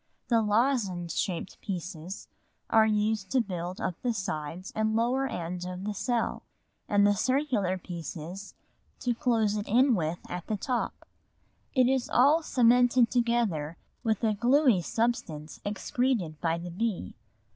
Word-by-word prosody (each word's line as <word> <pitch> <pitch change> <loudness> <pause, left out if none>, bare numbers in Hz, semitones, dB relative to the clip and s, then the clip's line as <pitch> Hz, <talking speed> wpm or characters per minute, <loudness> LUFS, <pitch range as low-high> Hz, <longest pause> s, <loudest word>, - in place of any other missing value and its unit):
The 230 -2 +4
lozenge 210 -6 +1
shaped 185 -1 -3
pieces 180 -1 -6 0.4
are 220 -1 +6
used 210 -2 0
to 260 - +2
build 180 -4 -3
up 175 - -3
the 240 -2 0
sides 170 -1 -4
and 220 0 +1
lower 250 +4 +1
end 175 -4 -4
of 180 +1 -5
the 210 +1 -2
cell, 235 +3 -1 0.5
and 205 0 +4
the 205 - +5
circular 235 -5 +1
pieces 175 +2 -7 0.5
to 245 - +1
close 225 -3 +1
it 210 - -4
in 250 +4 +4
with 170 -4 0
at 180 -1 -6
the 215 - -1
top; 245 +4 -3 0.7
it 255 -2 +5
is 260 -1 +1
all 290 +6 +5
cemented 245 -3 +4
together 230 -11 0 0.3
with 220 -3 0
a 220 -1 +3
gluey 245 - +4
substance 225 -8 -2
excreted 205 - -1
by 165 0 +1
the 175 +1 -6
bee. 190 - -2
210 Hz, 145 wpm, -28 LUFS, 180-240 Hz, 0.7 s, are